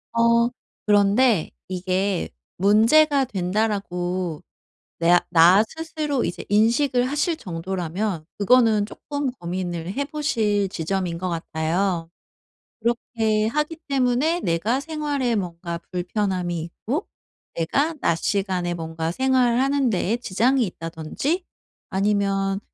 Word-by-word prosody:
어 235 0 +4 0.4
그런데 205 -1 +3 0.2
이게 185 +1 -1 0.3
'문제가 265 - +4
된다.'라고 185 -4 -2 0.6
내 175 +1 +5
나 175 +4 +7
스스로 310 -4 -3
이제 175 - -5
인식을 240 +5 +3
하실 295 +4 0
정도라면 180 0 -3
그거는 220 -1 +4
쪼금 285 0 -4
고민을 175 -3 -4
해보실 225 -8 0
지점인 180 0 -2
것 185 - -2
같아요. 165 +1 -1 0.7
그렇게 225 -2 0
하기 300 +5 -1
때문에 275 +5 +1
내가 200 +10 0
생활에 290 -5 -1
뭔가 170 -3 -4
불편함이 180 -1 -1
있고 225 - -4 0.5
내가 280 - 0
낮 165 - +2
시간에 185 -1 -1
뭔가 165 0 -3
생활하는 260 +2 +2
데에 200 +3 0
지장이 245 +4 +2
있다든지 165 - -3 0.5
아니면 195 0 0
205 Hz, 245 characters per minute, -23 LUFS, 175-255 Hz, 0.7 s, 나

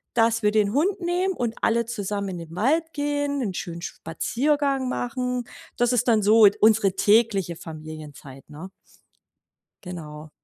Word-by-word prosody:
dass 230 0 +3
wir 210 - +3
den 210 -1 +1
Hund 370 +7 +1
nehmen 360 +2 0
und 235 -2 -2
alle 235 0 +2
zusammen 205 -3 -3
in 180 - -5
den 165 0 -10
Wald 315 - +1
gehen, 290 -1 -1
'nen 205 -7 -2
schönen 170 -1 -6
Spaziergang 270 - -1
machen. 250 0 -2 0.3
Das 245 +1 +2
ist 245 +1 +1
dann 220 -3 +3
so 215 +1 +6
ed 200 - +1
unsere 215 -3 +4
tägliche 205 -5 +2
Familienzeit, 155 -4 -10
ne? 160 +6 -9 1.1
Genau. 155 -4 -8
220 Hz, 150 wpm, -24 LUFS, 180-255 Hz, 1.1 s, so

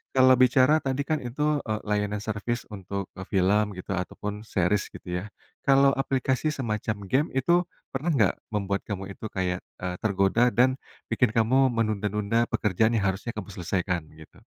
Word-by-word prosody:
kalau 130 0 +7
bicara 130 +4 +5
tadi 135 -1 -1
kan 155 +1 -1
itu, 150 +5 0
eee, 110 0 -1
layanan 105 0 -1
service 110 +2 -3
untuk 100 -1 -5 0.2
film 100 +2 +3
gitu, 90 +1 -7
ataupun 100 +2 -4
series 95 +1 +1
gitu 90 -1 -4
ya. - - -7 0.4
Kalau 135 0 +6
aplikasi 135 +1 0
semacam 110 -6 -2 0.2
game 145 +5 +2
itu, 170 +7 +3 0.3
pernah 140 +6 -1
nggak 120 - +3 0.2
membuat 100 -2 -1
kamu 100 -1 -4
itu 110 - -7
kayak, 90 -2 -1 0.2
eee, 90 0 -2
tergoda 100 +3 +3
dan, 130 +2 +2 0.3
bikin 125 - +3
kamu 130 +4 +4
menunda-nunda 110 0 0
pekerjaan 110 +3 +1
yang 105 - +1
harusnya 115 +4 -6
kamu 105 -2 -6
selesaikan 90 -1 -1
gitu? 80 -1 -16
110 Hz, 155 wpm, -26 LUFS, 100-130 Hz, 0.4 s, kalau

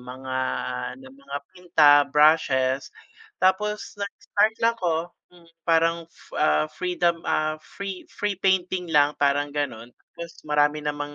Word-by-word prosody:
mga, 130 +1 -6 0.4
ah, 125 - -4
na 265 - -13
mga 275 - -8 0.2
pinta, 170 -5 +4 0.2
brushes, 140 -3 +3 0.5
tapos 210 +3 0
nag-start 205 +2 0
lang 230 0 +4
ko 170 0 -1 0.2
mm, 170 -1 -20 0.2
parang, 165 0 +2 0.3
ah, 75 0 +3
freedom, 175 -2 0
ah, 155 0 0
free, 195 +2 -7
free 205 -1 -2
painting 185 -2 +1
lang 145 0 +4
parang 145 +1 +2
gano'n. 125 -5 -4 0.3
Tapos 170 -1 -9
marami 150 0 +2
namang 145 0 -4
160 Hz, 130 wpm, -24 LUFS, 145-185 Hz, 0.5 s, pinta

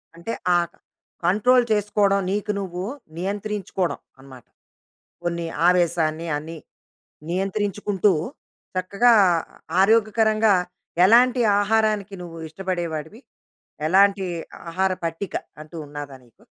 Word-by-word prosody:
అంటే, 170 +7 -6 0.2
ఆ - - +5
క - - -43 0.5
కంట్రోల్ 240 +7 +4
చేసుకోవడం, 205 -1 +2
నీకు 210 +1 -1
నువ్వు 180 -1 -5 0.3
నియంత్రించుకోవడం 195 -1 -3 0.2
అన్నమాట. 130 -3 -14 0.8
కొన్ని 170 -1 -2 0.2
ఆవేశాన్ని, 170 -2 +1
అన్ని 160 +3 -6 0.7
నియంత్రించుకుంటూ, 200 +1 0 0.6
చక్కగా 200 +6 +3 0.7
ఆరోగ్యకరంగా 220 0 +4 0.5
ఎలాంటి 245 +5 +5 0.2
ఆహారానికి 215 -1 +1
నువ్వు 165 -1 -9
ఇష్టపడేవాడివి? 175 - -4 0.7
ఎలాంటి 195 +2 +4 0.5
ఆహార 190 +2 +1
పట్టిక 165 +4 -4 0.3
అంటూ 155 +2 -11
ఉన్నదా 145 -1 -8
నీకూ? 120 - -26
195 Hz, 90 wpm, -23 LUFS, 170-210 Hz, 0.8 s, ఆ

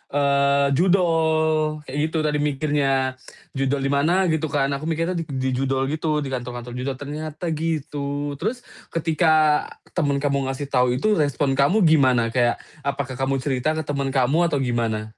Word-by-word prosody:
eee, 140 0 +3
judol 160 -3 +2
kayak 140 +1 -7
gitu 160 - -3
tadi 150 -1 0
mikirnya. 135 -3 0 0.3
Judol 135 +1 -1
di 135 - 0
mana 165 +7 +2
gitu 160 0 0
kan, 140 -1 0
aku 140 +3 -3
mikirnya 165 +3 -1
di 135 -5 -3
judol 135 +1 0
gitu, 155 -1 -1
di 135 - -5
kantor-kantor 120 -1 -5
judol. 130 +2 -3
Ternyata 155 +4 -5
gitu, 145 -2 -3
terus 235 +7 -2 0.3
ketika 155 -2 +3 0.3
temen 140 -5 0
kamu 140 -2 0
ngasih 135 +1 -4
tau 125 -1 +3
itu 210 +11 +1
respon 145 -1 +1
kamu 180 +10 +3
gimana? 130 -7 +4
Kayak 120 0 +1 0.2
apakah 135 -2 -3
kamu 135 +1 0
cerita 140 +3 0
ke 160 - -2
temen 140 -1 -2
kamu 145 +7 +3
atau 145 -3 -1
gimana? 115 -3 -1
145 Hz, 160 wpm, -23 LUFS, 135-155 Hz, 0.3 s, gimana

